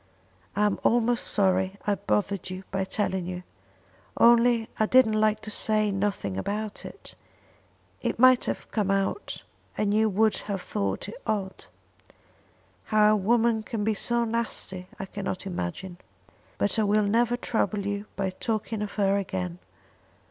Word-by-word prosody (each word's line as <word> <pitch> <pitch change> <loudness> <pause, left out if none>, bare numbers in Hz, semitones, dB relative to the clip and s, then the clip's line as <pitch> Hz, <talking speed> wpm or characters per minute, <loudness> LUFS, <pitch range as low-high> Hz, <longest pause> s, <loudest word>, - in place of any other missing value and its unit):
"I 205 - +2
am 205 - 0
almost 240 +1 +2
sorry 190 -1 +1
I 205 - +2
bothered 200 -1 -1
you 185 +1 -6
by 190 0 -1
telling 190 -3 -2
you, 180 0 -5 0.7
only 235 -1 +5
I 215 - +3
didn't 250 -3 +5
like 215 0 +2
to 215 0 -6
say 215 -1 +1
nothing 195 - -2
about 210 - -4
it. - - -10 0.9
It - - -1
might 255 0 +6
have - - -4
come 210 -3 0
out, 195 - -1 0.3
and 205 -1 +1
you 220 +1 +3
would 215 +2 +2
have 200 -1 -1
thought 100 - -2
it 205 - -9
odd. 195 -3 -2 1.2
How 215 -1 +4
a - - +4
woman 225 +2 +2
can 215 0 -4
be 220 +1 +2
so 235 +3 0
nasty 220 -5 -3
I 195 - -5
cannot 190 -1 -5
imagine. 175 - -5 0.6
But 205 - +1
I - - +3
will 210 +1 +3
never 235 +3 +2
trouble 210 -4 -1
you 205 +1 -3
by 195 -1 -1
talking 215 +2 -3
of 210 - -4
her 200 -1 +2
again. 90 - -3
205 Hz, 155 wpm, -27 LUFS, 195-220 Hz, 1.2 s, might